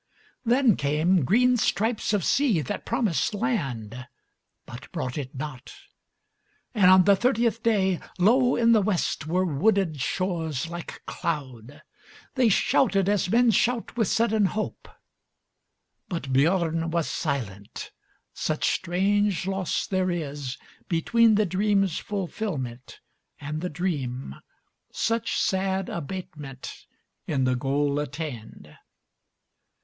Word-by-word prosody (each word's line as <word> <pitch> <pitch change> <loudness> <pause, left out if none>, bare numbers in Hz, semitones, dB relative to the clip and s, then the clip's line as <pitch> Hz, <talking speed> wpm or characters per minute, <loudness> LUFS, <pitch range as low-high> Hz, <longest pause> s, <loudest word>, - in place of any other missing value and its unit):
Then 245 -2 +3
came 155 +4 +2
green 250 - +4
stripes 220 +1 0
of 205 -5 0
sea 265 - +2
that 125 - -5
promised 215 - 0
landBut 130 - -6
brought 125 -1 -4
it 140 -1 -5
not, 135 -2 -7 1.0
and 200 -6 +5
on 185 0 +7
the 200 +2 +5
thirtieth 230 +1 +1
dayLow 220 +3 +2
in 230 0 +4
the 220 -2 +5
West 185 -6 -1
were 180 +3 +1
wooded 175 -1 +1
shores 165 -4 -2
like 170 0 -8
cloud. 140 -3 -5 0.5
They 255 -4 +3
shouted 195 -1 +2
as 200 -3 +1
men 235 +3 +4
shout 235 +3 0
with 225 -4 +1
sudden 220 -1 +2
hope; 215 +3 -4 1.2
But 165 -8 -4
Biörn 165 +3 +2
was 170 -1 0
silent, 110 - -4 0.4
such - - 0
strange 195 +2 +1
loss 190 -2 -1
there 185 -1 0
isBetween 165 - 0
the 210 0 +3
dream's 195 -1 +1
fulfilment 170 - -5 0.4
and 150 +2 -5
the 180 - -2
dream, 140 - -3 0.5
Such 230 0 -1
sad 190 0 0
abatement 150 -5 -7 0.4
in 135 -4 0
the 130 0 +2
goal 140 +3 0
attained. 140 - -7
180 Hz, 110 wpm, -26 LUFS, 145-210 Hz, 1.2 s, on